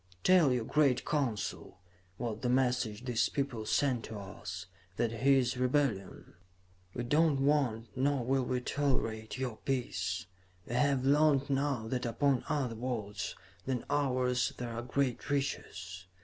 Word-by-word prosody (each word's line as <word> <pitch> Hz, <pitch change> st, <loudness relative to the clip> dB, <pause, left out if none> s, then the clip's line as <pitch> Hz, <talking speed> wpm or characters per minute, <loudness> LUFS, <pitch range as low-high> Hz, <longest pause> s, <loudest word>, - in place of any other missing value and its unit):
"'Tell 180 Hz, -7 st, +6 dB
your 125 Hz, -3 st, 0 dB
great 140 Hz, -3 st, +2 dB
Council,' 135 Hz, -9 st, -2 dB, 0.4 s
was 115 Hz, -2 st, -3 dB
the 125 Hz, -, 0 dB
message 125 Hz, -3 st, +1 dB
these 120 Hz, -3 st, +1 dB
people 125 Hz, -6 st, -2 dB
sent 130 Hz, -3 st, +1 dB
to 110 Hz, -, -7 dB
us, 95 Hz, -2 st, -7 dB, 0.3 s
'that 115 Hz, -2 st, +1 dB
here 135 Hz, +4 st, +4 dB
is 125 Hz, -1 st, +1 dB
rebellion. 125 Hz, -, 0 dB, 0.6 s
We 120 Hz, -, -2 dB
do 155 Hz, +6 st, +4 dB
not 140 Hz, -3 st, 0 dB
want, 135 Hz, -5 st, +1 dB
nor 135 Hz, -1 st, +1 dB
will 135 Hz, +1 st, +2 dB
we 125 Hz, 0 st, -1 dB
tolerate, 125 Hz, -5 st, -1 dB
your 125 Hz, -4 st, -3 dB
peace. 95 Hz, -9 st, -2 dB, 0.4 s
We -, -, -5 dB
have 135 Hz, +1 st, +2 dB
learned 140 Hz, -1 st, +4 dB
now 135 Hz, -4 st, 0 dB
that 125 Hz, -1 st, -1 dB
upon 135 Hz, +2 st, +1 dB
other 140 Hz, -6 st, 0 dB
worlds 110 Hz, -5 st, -4 dB, 0.3 s
than 130 Hz, -3 st, -1 dB
ours 125 Hz, -3 st, +1 dB
there 120 Hz, -1 st, -4 dB
are 115 Hz, -, -3 dB
great 125 Hz, +1 st, -1 dB
riches. 95 Hz, -10 st, -3 dB
125 Hz, 150 wpm, -32 LUFS, 115-140 Hz, 0.6 s, Tell